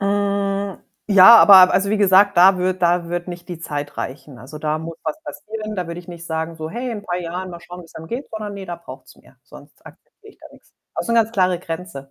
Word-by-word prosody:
Äh, 200 Hz, -1 st, -1 dB, 0.3 s
ja, 200 Hz, +3 st, +8 dB
aber, 190 Hz, -4 st, +8 dB
also, 195 Hz, +2 st, +1 dB
wie 215 Hz, -, +1 dB
gesagt, 200 Hz, 0 st, +4 dB
da 185 Hz, +2 st, +6 dB
wird 185 Hz, 0 st, -1 dB
da 170 Hz, 0 st, +1 dB
wird 175 Hz, +1 st, -4 dB
nicht 175 Hz, 0 st, -9 dB
die 175 Hz, -, -7 dB
Zeit 145 Hz, -2 st, -6 dB
reichen. 135 Hz, -1 st, -7 dB
Also, 135 Hz, +5 st, -11 dB
da 155 Hz, 0 st, -2 dB
muss 165 Hz, +1 st, -8 dB
was 310 Hz, -, -4 dB
passieren. 215 Hz, -1 st, -8 dB
Da 180 Hz, -2 st, -3 dB
würde 170 Hz, +1 st, -7 dB
ich 175 Hz, -, -21 dB
nicht 170 Hz, -1 st, -10 dB
sagen 160 Hz, 0 st, -4 dB
so: 160 Hz, 0 st, -7 dB
„Hey, 245 Hz, +5 st, -5 dB
in 215 Hz, -3 st, -6 dB
paar 180 Hz, -3 st, -4 dB
Jahren, 180 Hz, +2 st, -6 dB
mal 170 Hz, -1 st, -10 dB
schauen, 180 Hz, +1 st, -11 dB
wie's 165 Hz, -, -19 dB
einem 160 Hz, -, -10 dB
geht.“, 245 Hz, -, -6 dB
sondern, 215 Hz, -2 st, -6 dB
ne, 200 Hz, -1 st, -8 dB
da 175 Hz, -, -6 dB
braucht's 170 Hz, -, -13 dB
mehr. -, -, -23 dB
Sonst -, -, -17 dB
akzeptiere 425 Hz, -1 st, -17 dB
ich -, -, -30 dB
da -, -, -14 dB
nix. -, -, -22 dB, 0.2 s
Auch -, -, -3 dB
so 235 Hz, -, -3 dB
'ne 230 Hz, -, +4 dB
ganz 225 Hz, 0 st, -2 dB
klare 185 Hz, -4 st, +1 dB
Grenze. 165 Hz, -5 st, -8 dB
180 Hz, 250 wpm, -20 LUFS, 170-200 Hz, 0.3 s, ja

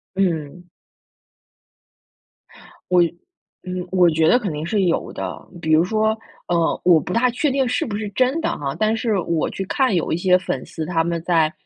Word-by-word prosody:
嗯。 175 Hz, -2 st, -2 dB, 2.2 s
我 180 Hz, -1 st, +5 dB, 0.6 s
嗯， 180 Hz, -1 st, -4 dB
我 180 Hz, -2 st, +5 dB
觉 160 Hz, 0 st, +2 dB
得 245 Hz, -, +5 dB
肯 200 Hz, -7 st, -3 dB
定 150 Hz, +1 st, -4 dB
是 205 Hz, +2 st, 0 dB
有 175 Hz, -2 st, 0 dB
的。 -, -, -6 dB, 0.2 s
比 160 Hz, -, -1 dB
如 155 Hz, +1 st, +5 dB
说， 220 Hz, +3 st, +1 dB, 0.3 s
呃， 170 Hz, -2 st, +1 dB
我 175 Hz, -3 st, +6 dB
不 -, -, -6 dB
大 250 Hz, +2 st, +3 dB
确 265 Hz, +4 st, 0 dB
定 265 Hz, -1 st, +1 dB
是 250 Hz, 0 st, 0 dB
不 205 Hz, -3 st, -4 dB
是 210 Hz, 0 st, -4 dB
真 255 Hz, +8 st, +1 dB
的 325 Hz, -, -1 dB
哈， 140 Hz, -2 st, -3 dB
但 215 Hz, +1 st, +2 dB
是 225 Hz, -2 st, 0 dB
我 170 Hz, -2 st, -1 dB
去 195 Hz, -, -5 dB
看 260 Hz, +2 st, +1 dB
有 170 Hz, -, 0 dB
一 -, -, +2 dB
些 180 Hz, +1 st, +3 dB
粉 170 Hz, -8 st, -4 dB
丝 160 Hz, -, -6 dB
他 165 Hz, 0 st, 0 dB
们 170 Hz, 0 st, -2 dB
在， 165 Hz, -3 st, +2 dB
180 Hz, 200 characters per minute, -21 LUFS, 165-220 Hz, 2.2 s, 我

